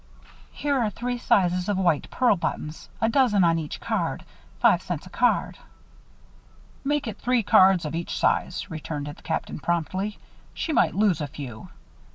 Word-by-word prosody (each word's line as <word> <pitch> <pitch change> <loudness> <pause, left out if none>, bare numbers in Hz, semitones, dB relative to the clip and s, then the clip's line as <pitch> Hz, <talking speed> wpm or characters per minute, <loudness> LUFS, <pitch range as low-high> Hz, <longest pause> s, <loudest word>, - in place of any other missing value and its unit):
"Here 285 -2 -1
are 225 -3 +1
three 245 +3 -4
sizes 185 -6 +2
of 205 - +1
white 170 -6 +1
pearl 245 -5 +3
buttons 155 -3 -4
a 225 - +2
dozen 225 -5 +3
on 165 -1 +3
each 155 -2 -6
card. - - -2 0.3
Five - - +4
cents - - -5
a - - -13
card." - - +1 1.2
"Make 290 +1 0
it 215 -3 -6
three 250 -2 +1
cards 190 -3 +5
of 150 - -4
each 170 +1 -3
size," 180 - 0
returned 155 -2 -5
the 145 - -6
Captain, 160 - -3
promptly. 185 +6 -2 0.4
"She 320 - -2
might - - +3
lose 195 -5 +2
a 145 - -2
few. 135 -6 -9
185 Hz, 165 wpm, -25 LUFS, 160-230 Hz, 1.2 s, cards